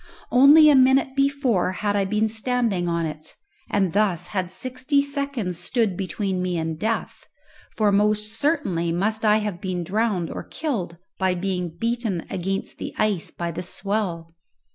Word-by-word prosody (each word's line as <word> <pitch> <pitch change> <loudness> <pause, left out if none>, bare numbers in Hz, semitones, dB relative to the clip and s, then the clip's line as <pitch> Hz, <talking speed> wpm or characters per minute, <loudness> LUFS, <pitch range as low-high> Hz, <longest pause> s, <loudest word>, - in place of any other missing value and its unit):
Only 285 +5 +8
a - - +5
minute 265 0 +4
before 275 -9 +1
had 205 +2 -1
I 200 -1 +2
been 210 +3 +1
standing 220 -5 -1
on 170 -1 0
it, 155 0 -7 0.3
and 195 -4 +1
thus 200 -5 +1
had 185 -3 -3
sixty 255 +7 0
seconds 280 - -2
stood 220 -4 0
between 190 +1 -2
me 180 -1 -1
and 160 -1 -3
death, 220 +2 -3 0.5
for 215 -2 +2
most 210 +1 +1
certainly 225 - 0
must 215 +6 0
I 210 -1 +5
have 190 -5 -4
been 180 -2 -3
drowned 195 -2 -1
or - - -5
killed 215 - -4 0.2
by 190 -1 +1
being 180 -1 -2
beaten 230 -5 -2
against 195 +2 -3
the - - -6
ice 205 -6 0
by 170 -1 -4
the 165 - -5
swell! 180 -3 -3
205 Hz, 160 wpm, -23 LUFS, 180-235 Hz, 0.5 s, Only